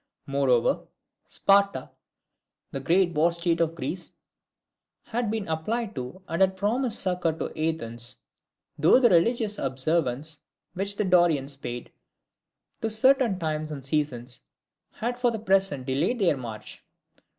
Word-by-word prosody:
Moreover, 135 -4 +1 0.4
Sparta, 200 -8 +2 0.8
the 135 - -3
great 175 +6 +2
war 160 +2 +3
state 170 0 0
of 165 0 0
Greece, 175 +1 -5 0.9
had 235 -1 -2
been 220 -2 -2
applied 210 +8 -2
to, 130 +10 -7
and 165 +3 -2
had 190 0 +4
promised 230 +4 +1
succour 180 -3 0
to 160 - -4
Athens, 125 -7 -3 0.6
though 155 - +6
the 240 -4 +5
religious 210 +4 +2
observance 145 +2 -1 0.3
which 195 +2 -2
the 210 - 0
Dorians 165 -7 +3
paid 120 -3 -7 0.9
to 225 - 0
certain 235 -1 +3
times 155 -2 -2
and 140 -4 -7
seasons 130 -4 -2 0.5
had 240 +2 -4
for 245 -1 +3
the 230 - -2
present 195 - +1
delayed 145 - 0
their 190 -9 +3
march. 115 -5 -8
170 Hz, 130 wpm, -26 LUFS, 140-200 Hz, 0.9 s, though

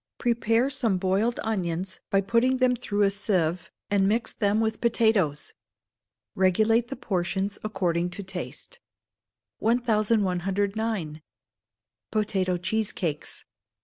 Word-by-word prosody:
Prepare 235 +1 +1
some 235 -8 +1
boiled 195 +6 +1
onions, 185 -4 -2
by 195 - +3
putting 235 +6 +2
them 255 -1 +3
through 210 -4 -1
a 195 - +4
sieve, 180 -5 0 0.2
and 195 -1 +3
mix 225 +3 0
them 205 0 +1
with 220 0 -1
potatoes. 220 -10 +2 0.8
Regulate 215 +5 +3
the 270 - -5
portions 195 -3 -2
according 180 -5 0
to 200 - -5
taste. 335 - -7 0.8
1109. 205 -5 0 0.9
Potato 195 -4 0
Cheesecakes. 185 -4 -2
205 Hz, 105 wpm, -26 LUFS, 185-225 Hz, 0.9 s, a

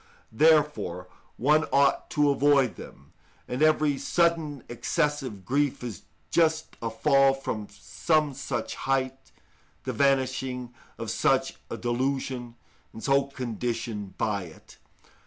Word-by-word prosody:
Therefore 150 - +2 0.3
one 150 +4 +3
ought 140 0 +2
to 145 -1 +3
avoid 140 -3 +3
them; 70 +4 -13 0.3
and 125 +3 -3
every 155 -2 +3
sudden 165 -5 +1
excessive 125 -4 -2
grief 140 +1 0
is 115 -7 -6 0.3
just 160 -1 +1
a 115 - -2
fall 135 +4 +3
from 110 -6 -4
some 155 +8 0
such - - -4
height, 135 0 -2 0.5
the - - -3
vanishing 130 -2 0 0.2
of - - -4
such - - +1
a - - -4
delusion, 125 0 -2 0.4
and 110 - -10
so 140 0 +3
conditioned 115 -6 -4
by 100 -4 -1
it. 80 - -15
135 Hz, 120 wpm, -27 LUFS, 120-145 Hz, 0.5 s, one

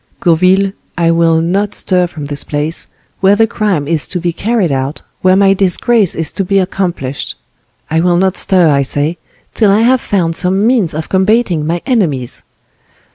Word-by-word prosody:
"Gourville, 185 +3 +2 0.3
I 165 -1 +2
will 165 -1 +2
not 195 +5 -1
stir 180 -2 +1
from 155 -4 -8
this 145 0 -4
place, 150 +2 -1 0.3
where 195 +1 +4
the 225 +2 +3
crime 200 -9 -2
is 160 -2 -1
to 180 - -4
be 175 0 -2
carried 210 -3 0
out, 135 +2 -3 0.2
where 185 0 +4
my 195 0 +4
disgrace 195 +2 +1
is 160 -1 -1
to 195 - -3
be 195 +2 0
accomplished; 180 -8 -3 0.6
I 160 - +2
will 175 0 +2
not 190 +1 +1
stir, 185 -3 +3
I 140 -1 +2
say, 145 +5 -2 0.3
till 215 -3 +2
I 205 +3 +3
have 250 +2 +3
found 170 -5 -1
some 190 +4 +1
means 220 - +1
of 155 0 -4
combating 190 -5 +1
my 170 +1 -2
enemies." 160 - -1
180 Hz, 180 wpm, -13 LUFS, 160-195 Hz, 0.6 s, where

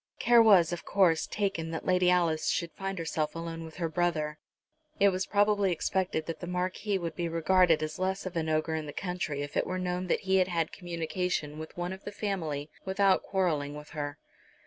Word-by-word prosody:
Care 240 -1 +6
was, 185 -7 +6
of 175 - -5
course, 180 -5 +3
taken 195 -6 -2
that 160 -1 -5
Lady 180 -1 +3
Alice 170 -3 +2
should 170 -1 -1
find 195 0 -5
herself 160 -2 -2
alone 165 0 -5
with 160 -1 -10
her 170 -2 -1
brother. 155 -2 -1 0.6
It 200 - +6
was 185 0 -2
probably 205 -1 +3
expected 175 -1 -1
that 165 - -5
the 175 - -6
Marquis 185 +3 -1
would 170 -3 -4
be 170 +1 -2
regarded 165 -1 +3
as 155 +1 -4
less 190 +1 -1
of 185 - -5
an 160 -1 -1
ogre 155 +1 0
in 155 -1 -3
the 145 - -7
country 175 -6 -3
if 145 - -8
it - - +1
were 185 - -2
known 180 0 -2
that - - +1
he 190 0 +2
had 185 -1 +3
had 165 -3 -1
communication 170 -3 -3
with 160 +2 -9
one 175 +1 -2
of 190 - -10
the 205 - -6
family 160 -8 -3
without 190 0 +3
quarrelling 155 -7 -1
with 150 0 -9
her. 145 -2 -4
175 Hz, 210 wpm, -29 LUFS, 160-190 Hz, 0.6 s, Care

